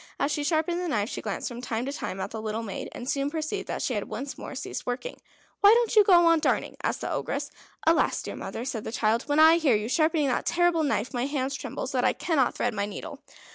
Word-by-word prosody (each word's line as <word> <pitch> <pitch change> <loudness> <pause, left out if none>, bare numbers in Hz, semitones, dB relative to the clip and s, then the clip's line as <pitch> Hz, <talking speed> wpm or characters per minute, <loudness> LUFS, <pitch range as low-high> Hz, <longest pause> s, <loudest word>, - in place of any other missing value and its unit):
As 280 - +1
she 295 -1 -1
sharpened 325 +3 0
the 360 - -2
knife, 215 -8 0
she - - -5
glanced 205 -3 -3
from 240 0 -6
time 235 -1 -2
to 275 - -3
time 195 -9 -5
at - - -4
the 220 - -5
little 220 +1 -3
maid, 200 -4 -5
and 245 - -8
soon 275 +1 0
perceived 315 +5 -3
that - - -3
she 255 - 0
had 205 -3 -2
once 260 +6 -5
more - - -8
ceased 265 - -6
working. 250 - -4 0.4
"Why 410 +2 +7
don't 470 -1 +1
you 425 - +8
go 355 -3 +6
on 330 -1 +5
darning?" - - 0
asked - - -1
the - - -3
Ogress. - - -3 0.3
"Alas! 325 0 +3
dear - - -6
mother," 235 - -5
said 230 -5 -3
the - - -5
child, 225 0 +1
"when 290 0 +1
I 320 +1 +8
hear 295 -8 +3
you 210 +1 -1
sharpening 310 +2 +2
that 250 - -1
terrible 350 -1 +3
knife 280 -5 -1
my 245 +1 -1
hands 275 -2 -2
tremble 275 - -5
so - - -2
that - - +1
I - - +3
cannot 295 -7 +1
thread 245 - -1
my 200 -1 -1
needle." 205 - -7
280 Hz, 255 wpm, -27 LUFS, 230-325 Hz, 0.4 s, you